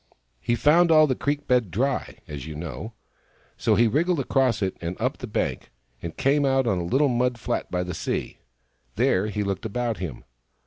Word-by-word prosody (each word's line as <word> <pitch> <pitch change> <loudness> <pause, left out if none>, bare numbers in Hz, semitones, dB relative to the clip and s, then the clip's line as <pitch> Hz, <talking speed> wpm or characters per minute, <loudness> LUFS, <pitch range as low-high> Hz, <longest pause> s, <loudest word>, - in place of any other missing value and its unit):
He 120 - 0
found 165 +7 +4
all 155 -1 +7
the 135 - +1
creek 145 +3 -2
bed 125 -5 +2
dry, 130 +10 -1
as 75 -1 -7
you 80 - -6
know; 75 -5 -6 0.6
so - - +2
he 120 - +4
wriggled 165 - +1
across 130 -5 +1
it 95 - -1
and 85 +2 -4
up - - -1
the - - -6
bank, - - -2 0.3
and 85 - -6
came 145 +2 +2
out 135 -1 +2
on 95 -6 +1
a - - -2
little 135 +12 +2
mud 125 -1 +1
flat - - -3
by 90 0 -1
the 90 0 -5
sea. - - -3 0.6
There 95 +3 +2
he 105 -1 -2
looked 100 0 -3
about 115 +1 -2
him. 80 -9 -6
120 Hz, 195 wpm, -25 LUFS, 90-135 Hz, 0.6 s, all